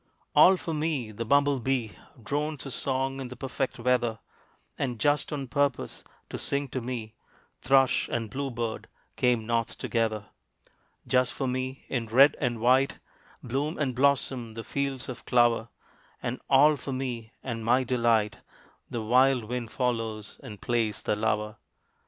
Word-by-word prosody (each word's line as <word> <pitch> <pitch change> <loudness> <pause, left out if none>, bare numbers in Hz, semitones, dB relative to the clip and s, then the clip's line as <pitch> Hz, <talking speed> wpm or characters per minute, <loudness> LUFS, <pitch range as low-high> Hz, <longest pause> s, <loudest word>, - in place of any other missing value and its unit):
All 190 0 +8
for 165 - -4
me 150 -7 -1
the 115 +2 -5
bumble 140 +2 +3
bee 125 -3 -1 0.3
Drones 150 +3 -2
his 135 - -5
song 135 0 -1
in 130 - -4
the 125 - -8
perfect 135 +1 -3
weather; 120 -2 +1 0.6
And, 125 -3 -2
just 145 +7 +2
on 140 -3 -3
purpose 140 0 -1 0.3
to - - -4
sing 140 0 -2
to 130 - -3
me, 115 -3 -5 0.5
Thrush 135 -1 +3
and 115 -1 -1
blue 140 +2 -2
bird 115 -2 -4 0.3
came 120 -3 +2
North 115 0 -1
together. 110 -3 -1 0.8
Just 125 0 +2
for 135 - -3
me, 130 +1 -3
in 120 -4 -2
red 135 +6 +6
and 120 -4 0
white, 130 +4 +3 0.5
Bloom 140 +6 -2
and 135 -4 0
blossom 130 -3 +1
the 115 - -5
fields 140 -1 -2
of 125 -3 -7
clover; 120 -2 +3 0.5
And 120 +2 -4
all 145 +2 +6
for 135 - -6
me 120 -4 -4
and 115 -3 -4
my 125 +3 +3
delight 115 -5 +1 0.5
The 115 -2 -3
wild 125 +2 +4
Wind 120 +1 -4
follows 115 -4 -2
and 105 -2 -9
plays 115 -4 -1
the - - +1
lover. 105 0 -1
125 Hz, 155 wpm, -28 LUFS, 115-135 Hz, 0.8 s, All